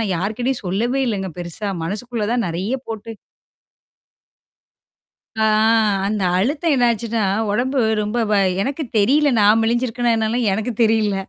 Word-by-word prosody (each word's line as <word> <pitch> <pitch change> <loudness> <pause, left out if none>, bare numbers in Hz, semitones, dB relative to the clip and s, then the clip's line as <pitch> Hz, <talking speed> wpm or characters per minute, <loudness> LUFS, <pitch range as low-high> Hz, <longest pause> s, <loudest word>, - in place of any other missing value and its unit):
நான் 205 -4 -1
யார்கிட்டயும் 235 +8 -2
சொல்லவே 235 +9 0
இல்லங்க 195 -5 -2
பெருசா. 175 +4 -5 0.2
மனசுக்குள்ள 215 +4 -3
தான் 245 -3 0
நெறைய 185 +9 -2
போட்டு 225 0 -7 2.3
ஆ - - +4 0.6
அந்த 210 -1 -2 0.2
அழுத்தம் 290 - +1
என்னாச்சுன்னா, 235 -3 0 0.3
உடம்பு 260 +5 0 0.2
ரொம்ப 210 +3 -3
வ - - +3 0.3
எனக்கு 280 +7 -2
தெரியல, 280 +8 +3
நான் 215 +2 +5
மெளிஞ்சிருக்கனே 240 0 0
என்னாலுல 225 +3 0
எனக்கு 220 +4 -2
தெரியல. 215 -2 +2
225 Hz, 120 wpm, -20 LUFS, 205-245 Hz, 2.3 s, நான்